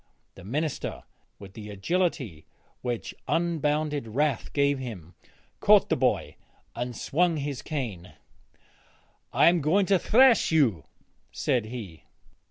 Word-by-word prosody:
The - - -13
minister, 145 - -3 0.3
with 100 -1 -12
the 105 0 -9
agility 115 - -2 0.3
which 120 -2 -4
unbounded 150 -5 0
wrath 135 +2 -1
gave 140 -1 +1
him, 95 -10 -8 0.5
caught - - +5
the - - +3
boy' - - 0 0.4
and 120 0 -4
swung 170 +2 +1
his 140 -2 -4
cane. 115 - -5 1.2
'I - - +4
am 170 -1 +4
going 180 +7 +3
to 195 -1 +3
thrash 250 0 +5
you,' 120 - +2 0.5
said 120 -4 0
he. 110 -8 -8
140 Hz, 120 wpm, -27 LUFS, 110-160 Hz, 1.2 s, caught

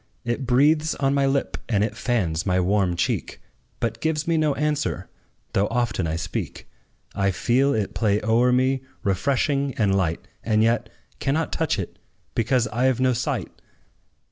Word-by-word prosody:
It 120 +2 -2
breathes 150 +5 +3
on 135 0 +1
my 140 -1 +2
lip, 135 0 0
and 105 -3 +2
it 110 - -2
fans 90 -10 0
my 90 -2 +1
warm 95 -1 +2
cheek, - - -2 0.4
But 115 0 -2
gives 160 0 0
me 165 - +2
no 155 -2 +2
answer, 150 0 -1 0.4
though 100 +1 +2
often 115 -8 0
I 80 - -1
speak: 85 +2 -5 0.5
I 100 0 +1
feel 120 +10 +2
it 105 -2 -1
play 105 -2 +1
o'er 115 +3 +3
me, 130 +1 +2 0.2
refreshing 135 +6 0
and 105 -4 +2
light, 85 -4 -1 0.2
And 110 -1 +2
yet 115 0 +1 0.3
cannot 150 +3 0
touch - - 0
it, - - -5 0.3
because 125 +1 +1
I 125 +4 +2
've 125 - -3
no 130 -1 +3
sight! 120 +1 -2
120 Hz, 165 wpm, -24 LUFS, 100-135 Hz, 0.5 s, breathes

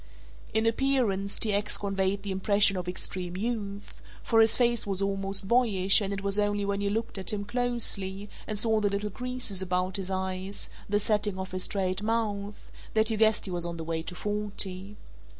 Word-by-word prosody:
In 220 +1 +1
appearance 225 -5 +1
T. 215 -2 +2
X. 205 +1 +1
conveyed 195 0 -1
the 200 - -4
impression 200 +1 +3
of 180 -1 -4
extreme 180 0 -4
youth, 200 - -5 0.2
for 225 - +4
his 220 0 +3
face 235 -3 +2
was 195 -2 -1
almost 195 0 -1
boyish 205 -5 +5
and 200 -1 -2
it 200 0 -4
was 200 +1 +1
only 205 -1 0
when 200 0 -2
you 200 - 0
looked 220 -1 -3
at 190 - 0
him 205 -1 -3
closely 205 -4 0 0.2
and 215 - -3
saw 220 +1 +2
the 205 -1 +1
little 200 +1 -3
creases 250 -4 +2
about 180 0 -1
his 190 -1 -5
eyes, 190 +1 -2 0.2
the 205 - +2
setting 210 -2 0
of 190 0 -6
his 185 0 +1
straight 190 -1 -1
mouth, 205 - -3 0.2
that 220 +1 +3
you 220 - -1
guessed 220 0 +3
he 190 - -2
was 175 -1 -1
on 170 0 -4
the 165 - -5
way 165 0 -3
to 180 +2 -6
forty. 205 -1 -3
200 Hz, 195 wpm, -28 LUFS, 190-215 Hz, 0.2 s, boyish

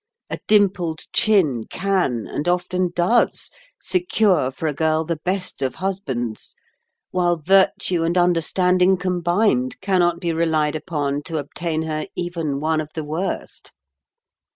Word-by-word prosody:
A - - -3
dimpled 185 -6 +2
chin 160 - +3
can, 185 - -1
and 150 - -4
often 180 +1 0
does, 185 +8 +2 0.3
secure 220 - +1
for 135 +4 -7
a 155 - 0
girl 160 +2 +1
the 170 0 -2
best 185 -1 -3
of 130 -2 -1
husbands; 135 - -4 0.6
while 175 -1 +1
virtue 185 +1 +2
and 170 +2 0
understanding 180 +2 +3
combined 175 - 0
cannot 180 -3 +1
be 170 -2 -1
relied 160 -2 +1
upon 145 -3 -2
to 165 -3 -3
obtain 160 +2 -3
her 155 +1 -3
even 165 -5 -3
one 155 +1 0
of 155 - -7
the 160 - -3
worst." 160 +6 -4
170 Hz, 130 wpm, -21 LUFS, 155-185 Hz, 0.6 s, chin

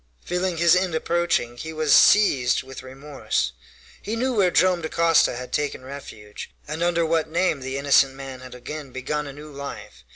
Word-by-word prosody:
Feeling 180 0 -1
his 170 +1 +5
end 180 -2 0
approaching, 165 -8 0
he 160 +6 -6
was 155 -2 +1
seized 135 -13 +5
with 130 0 -10
remorse. 135 - -3 0.5
He 215 - -4
knew 255 +3 -1
where 200 -5 +3
Joam 180 0 +2
Dacosta 165 -3 +2
had 125 +1 -8
taken 145 -3 -2
refuge, 110 -7 -9 0.2
and 155 +3 -5
under 170 -1 +1
what 160 -1 0
name 170 -2 +1
the 130 +1 -5
innocent 140 -1 +3
man 135 -1 -8
had 125 0 -11
again 145 +3 -8
begun 145 +4 -4
a 140 - -8
new 150 +2 -11
life. 140 - -9
150 Hz, 175 wpm, -23 LUFS, 135-170 Hz, 0.5 s, his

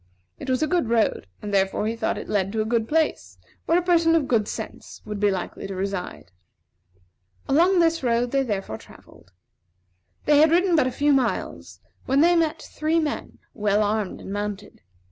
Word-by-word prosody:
It - - -7
was 255 +3 +1
a - - +1
good 340 -8 0
road; 225 - +1 0.2
and 205 - -5
therefore 195 +1 +1
he 225 +1 -1
thought 225 -1 -1
it - - -7
led 195 -2 0
to 220 - 0
a - - -7
good 225 0 0
place, 320 +3 -1 0.3
where 335 - +4
a 355 - +1
person 335 -2 +3
of 305 -5 +1
good 220 -4 +1
sense - - -7
would 210 -1 -5
be 205 0 +3
likely 190 0 -4
to 195 - -6
reside. 185 - -5 1.2
Along 350 +7 +4
this 330 -1 +3
road 240 -1 0
they 275 - +2
therefore 195 - -3
travelled. 90 - -18 0.9
They 295 -1 +5
had 315 +1 +6
ridden 350 +2 +3
but 295 -5 +3
a - - -2
few 290 +3 +2
miles 260 -3 -2 0.3
when 270 +2 +3
they 345 +2 +5
met 325 -2 0
three 315 +2 -1
men, 305 -2 -4 0.2
well 210 -1 +1
armed 210 -1 -2
and 195 - -7
mounted. 205 0 -5
240 Hz, 190 wpm, -24 LUFS, 205-315 Hz, 1.2 s, had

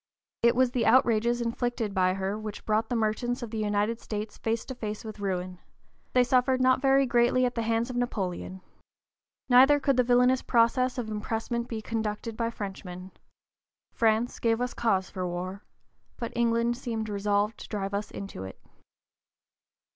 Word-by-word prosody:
It 235 0 +4
was 255 0 +3
the 245 -2 0
outrages 235 0 +3
inflicted 230 -2 -2
by 185 -1 +2
her 195 +1 -2
which 215 -1 -7
brought 215 +1 +1
the 245 - -1
merchants 235 +3 -1
of 230 - -6
the 220 - -3
United 210 +2 0
States 210 0 -5
face 225 0 -1
to 260 - -6
face 215 -3 -6
with 215 -1 -8
ruin; 185 -2 -3 0.5
they 250 - +5
suffered 255 +1 +2
not 255 0 +3
very 270 0 +4
greatly 245 +1 +3
at 245 - -1
the 230 - -2
hands 230 +2 0
of - - -7
Napoleon. 190 -6 -3 0.9
Neither 270 +4 +6
could 275 -2 +1
the 250 - +5
villainous 250 +1 +4
process 245 +2 +2
of 225 -3 -3
impressment 225 +2 -3
be 220 -3 -5
conducted 220 0 -3
by 230 0 -1
Frenchmen. 190 -4 -7
(p. - - -32 0.7
047) - - -35 0.3
France 245 - -8
gave 225 -1 +1
us 250 0 -2
cause 195 -5 0
for 185 -1 -3
war, 185 +3 -5 0.6
but 235 -2 -5
England 235 0 +1
seemed 225 -4 -4
resolved 205 +1 0
to - - -9
drive 200 -2 -3
us 205 +1 -2
into 195 - -7
it. 95 - -9
230 Hz, 175 wpm, -28 LUFS, 205-245 Hz, 0.9 s, Neither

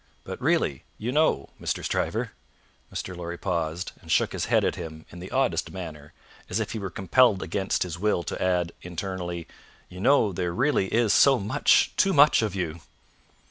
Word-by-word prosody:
But - - -7
really, 65 - +1
you 120 +3 -3
know, 150 - +2
Mr. - - -2
Stryver - - -1 0.3
" - - -36
Mr. 90 - -5
Lorry 85 0 -6
paused, 85 -2 -2
and - - -8
shook - - +2
his - - -2
head - - +2
at - - +1
him 80 -1 -8
in 90 - -10
the 90 +2 -8
oddest 135 -1 0
manner, 75 -5 -8 0.4
as 95 - -1
if 110 - -2
he 110 - -4
were 95 -2 -4
compelled 95 +4 +3
against 95 -1 -1
his 85 -2 -6
will 105 -3 +1
to - - -5
add, 90 -2 +1
internally, 90 -1 -5 0.4
"you 90 - -10
know 115 -2 +3
there 85 0 -2
really 130 -5 +2
is 115 -2 +3
so 135 -2 +6
much 115 +7 +3
too 195 - +3
much 145 -3 +6
of 110 -3 -2
you!" 85 -3 -3
95 Hz, 185 wpm, -26 LUFS, 85-110 Hz, 0.4 s, so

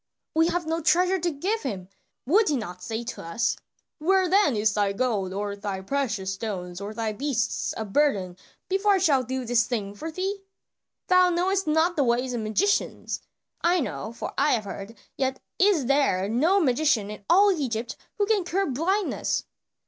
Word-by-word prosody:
"We 325 +1 +4
have 350 -1 -1
no 325 +1 -1
treasure 360 +4 +3
to 345 +1 0
give 375 +9 -2
him; 195 -9 -4 0.4
would 390 - +4
he 290 - +1
not 180 -6 -6
say 225 +3 -4
to - - -6
us, 230 +8 0 0.4
'Where 375 +4 +3
then 375 - +3
is 210 0 +2
thy 205 -1 +1
gold, 205 -5 -1
or 200 +1 -3
thy 200 -2 -4
precious 205 -5 -2
stones, 190 -3 -5
or 200 +1 -5
thy 220 0 -2
beasts 250 -1 -1
of 215 -3 -6
burden, 200 -12 +2 0.3
before 390 +2 +2
I - - +4
shall 305 -8 +3
do 255 +1 -4
this 235 -1 +2
thing 210 -5 -3
for 310 +11 -6
thee?' 385 +4 -3 0.6
Thou 365 0 +5
knowest 365 +1 0
not 320 +3 +2
the 290 - +2
ways 250 +1 +1
of 235 - -2
magicians; 285 - 0 0.4
I 350 +1 +3
know, 240 -6 -4
for 235 - -6
I 290 +2 +4
have 225 - 0
heard, 200 +3 -8 0.2
yet 265 -1 -1 0.2
is 375 -8 +4
there 255 -9 +2
no 310 - +3
magician 255 - +2
in 210 -1 -9
all 400 +3 +6
Egypt 245 - -2 0.2
who 410 - +2
can 415 -2 +2
cure 375 +3 0
blindness." 355 +8 -1
265 Hz, 180 wpm, -26 LUFS, 215-350 Hz, 0.6 s, all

